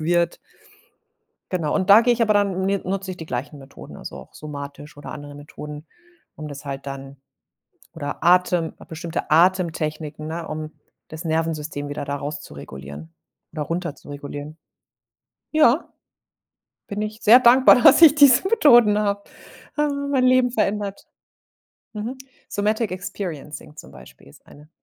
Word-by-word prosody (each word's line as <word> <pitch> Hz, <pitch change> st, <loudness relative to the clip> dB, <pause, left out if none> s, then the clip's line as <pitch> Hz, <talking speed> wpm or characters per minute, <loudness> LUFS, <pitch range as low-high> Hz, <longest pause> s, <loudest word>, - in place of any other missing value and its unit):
wird. 170 Hz, +2 st, +1 dB, 1.1 s
Genau, 165 Hz, -5 st, -1 dB
und 185 Hz, -, 0 dB
da 205 Hz, +3 st, +10 dB
gehe 240 Hz, +1 st, +3 dB
ich 235 Hz, -, 0 dB
aber 215 Hz, -2 st, +3 dB
dann 195 Hz, -2 st, +1 dB
mi 195 Hz, 0 st, +1 dB
nutze 190 Hz, 0 st, -4 dB
ich 185 Hz, -, -6 dB
die 160 Hz, -, -9 dB
gleichen 140 Hz, +3 st, -5 dB
Methoden, 135 Hz, 0 st, -12 dB
also, -, -, -9 dB
auch -, -, -13 dB
somatisch 145 Hz, 0 st, -9 dB
oder 145 Hz, -, -9 dB
andere 145 Hz, -1 st, -9 dB
Methoden, 150 Hz, +1 st, -10 dB, 0.5 s
um 155 Hz, -1 st, -8 dB
das 145 Hz, 0 st, -9 dB
halt 140 Hz, 0 st, -6 dB
dann 135 Hz, 0 st, -8 dB, 0.8 s
oder 145 Hz, 0 st, -6 dB
Atem, 175 Hz, -1 st, +3 dB, 0.2 s
bestimmte 165 Hz, +1 st, -5 dB
Atemtechniken, 160 Hz, -3 st, +1 dB
ne, 165 Hz, +1 st, -5 dB
um 155 Hz, 0 st, -6 dB, 0.4 s
das 160 Hz, +2 st, -9 dB
Nervensystem 155 Hz, -2 st, -2 dB
wieder 145 Hz, 0 st, -5 dB
da 140 Hz, 0 st, -3 dB
raus 145 Hz, +2 st, -5 dB
zu -, -, -12 dB
regulieren 70 Hz, +3 st, -10 dB, 0.4 s
oder 155 Hz, -2 st, -4 dB
runter 170 Hz, 0 st, -3 dB
zu -, -, -18 dB
regulieren. 145 Hz, +1 st, -8 dB, 1.0 s
Ja, 305 Hz, -1 st, +3 dB, 0.9 s
bin 205 Hz, +1 st, -4 dB
ich 215 Hz, 0 st, -5 dB
sehr 235 Hz, +4 st, +8 dB
dankbar, 250 Hz, 0 st, +6 dB
dass -, -, +7 dB
ich 300 Hz, -3 st, +9 dB
diese 285 Hz, +3 st, +6 dB
Methoden 240 Hz, -, +5 dB
habe. 200 Hz, -1 st, -1 dB, 0.5 s
Haben 280 Hz, -1 st, -1 dB
mein 260 Hz, -2 st, +2 dB
Leben 255 Hz, -1 st, +4 dB
verändert. 205 Hz, -3 st, -2 dB, 0.9 s
Mhm, 225 Hz, +5 st, -5 dB, 0.3 s
Somatic 215 Hz, +1 st, -1 dB
Experiencing 160 Hz, -6 st, -7 dB
zum -, -, -12 dB
Beispiel -, -, -16 dB
ist 70 Hz, -, -19 dB
eine. 150 Hz, +1 st, -17 dB
165 Hz, 150 wpm, -22 LUFS, 145-210 Hz, 1.1 s, da